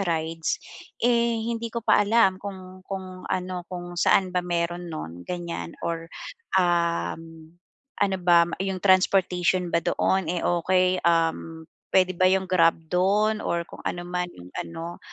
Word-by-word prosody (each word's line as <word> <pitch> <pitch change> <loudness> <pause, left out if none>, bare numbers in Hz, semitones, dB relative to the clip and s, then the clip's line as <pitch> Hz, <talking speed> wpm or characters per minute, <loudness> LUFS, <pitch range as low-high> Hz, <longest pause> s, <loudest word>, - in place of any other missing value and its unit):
rides. 165 -1 -1 0.4
Eh, 235 -1 +2
hindi 230 -1 -3
ko 235 - -2
pa - - +1
alam 205 -3 +3
kung 185 -2 -8
kung 185 -1 -7
ano, 180 -1 -2
kung 175 -1 -6
saan 185 +1 +2
ba 180 - +1
meron 175 0 -2
nun 90 - -7
ganyan 170 - -5
or 165 0 -4 0.5
um, 170 -2 -1 0.5
ano 195 -1 +2
ba 175 -1 +5
m - - -8
yung 190 -1 -3
transportation 185 -2 +3
ba 170 - +2
doon, 190 -2 +1
eh, 175 +1 -2
okey? 185 +1 +2
Um, 165 -1 +1 0.3
puwede 185 -1 +4
ba 185 - +5
yung 190 0 +2
grab 165 -2 +5 0.2
do'n 205 +4 +2
or 170 -5 -1
kung - - -11
ano 175 - -2
man 180 0 -2
yung 90 +1 -13
ano? 170 +1 -6
180 Hz, 150 wpm, -25 LUFS, 170-190 Hz, 0.5 s, ba